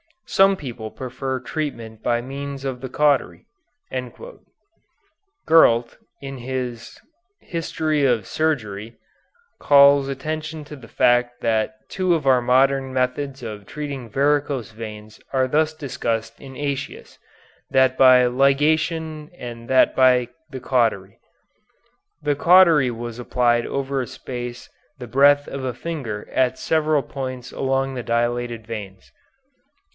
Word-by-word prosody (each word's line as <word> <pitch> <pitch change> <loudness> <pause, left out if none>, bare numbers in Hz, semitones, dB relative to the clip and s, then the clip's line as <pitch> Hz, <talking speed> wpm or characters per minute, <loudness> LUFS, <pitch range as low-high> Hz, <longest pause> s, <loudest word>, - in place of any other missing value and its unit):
Some 195 0 +4
people 120 -9 -7
prefer 130 0 -5
treatment 115 -7 -5
by 120 0 0
means 140 +2 -6
of 130 -2 -4
the 130 - -6
cautery." 145 +1 +1 2.0
Gurlt, 120 -7 +4 0.2
in 135 -1 -7
his 125 -2 -5 0.4
"History 155 -3 -1
of 120 -6 +1
Surgery," 115 -9 -2 0.6
calls 140 -1 +6
attention 155 +3 -5
to 150 - -9
the 125 -4 -13
fact 120 +1 +2
that 110 +1 0 0.2
two 185 -2 +1
of 155 -4 -3
our 130 -2 +4
modern 135 +2 +2
methods 130 +1 -2
of 105 -3 -7
treating 140 -5 -6
varicose 140 -1 0
veins 110 -1 -9
are 130 -1 +2
thus 155 +2 +2
discussed 115 -6 -4
in 135 -1 -10
Aëtius, 140 0 -5 0.5
that 130 -1 +3
by 130 -1 +7
ligation 150 +4 +1
and 120 -1 -8
that 130 +1 +4
by 125 -2 +4 0.2
the 130 -3 -8
cautery. 110 -7 0 1.0
The 145 -1 +1
cautery 170 -4 +5
was 120 0 -6
applied 120 -1 +1
over 140 0 -2
a 125 - -5
space 120 -2 -7 0.3
the 125 -3 -8
breadth 145 +4 +4
of 135 -1 -6
a 125 -2 -3
finger 130 -9 -5
at 130 -1 +1
several 155 -3 +1
points 130 -2 -6
along 135 0 -1
the 125 - -4
dilated 120 -1 -1
veins. 100 -4 -8
130 Hz, 125 wpm, -22 LUFS, 120-145 Hz, 2.0 s, by